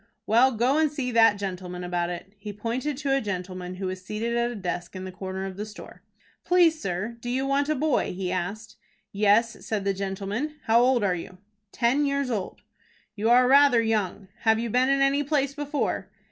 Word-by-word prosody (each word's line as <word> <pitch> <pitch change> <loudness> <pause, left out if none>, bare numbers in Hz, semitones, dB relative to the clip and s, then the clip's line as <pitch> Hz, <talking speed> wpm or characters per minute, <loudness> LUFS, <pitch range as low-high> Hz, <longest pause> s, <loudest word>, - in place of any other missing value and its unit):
"Well, 235 +5 +4
go 250 +7 +2
and 310 -2 +2
see 270 -4 -3
that 225 -3 +5
gentleman 180 -2 -5
about 175 -1 -1
it." 180 +3 -7
He 210 0 -6
pointed 240 +7 -3
to 280 -1 0
a 275 - +1
gentleman 185 -2 -5
who 190 +1 -5
was 185 0 -4
seated 220 +4 -3
at 235 0 +1
a 240 - -6
desk 180 -2 -4
in 185 - -6
the 185 - -6
corner 190 +1 -5
of 190 -1 -7
the 210 - -3
store. 210 0 -11 0.4
"Please, 340 -3 +3
sir, 195 +6 -3
do 240 - -6
you 260 +2 0
want 280 +1 +1
a 310 - +2
boy?" 295 -1 +1
he 180 0 -3
asked. 200 +5 -4 0.3
"Yes," 210 +3 +2
said 210 -3 -3
the 195 - +2
gentleman. 200 +9 -3
"How 230 0 +4
old 250 -2 +3
are 190 -3 +2
you?" 180 +1 -7 0.3
"Ten 255 +4 +2
years 280 -2 0
old." 205 -5 -4 0.5
"You 220 +2 0
are 250 +1 +6
rather 275 -2 +6
young. 210 -3 -1
Have 220 -1 +3
you 230 0 -3
been 255 +3 +3
in 275 0 +2
any 275 +1 +3
place 280 -1 0
before?" 290 0 -2
225 Hz, 205 wpm, -26 LUFS, 190-265 Hz, 0.5 s, are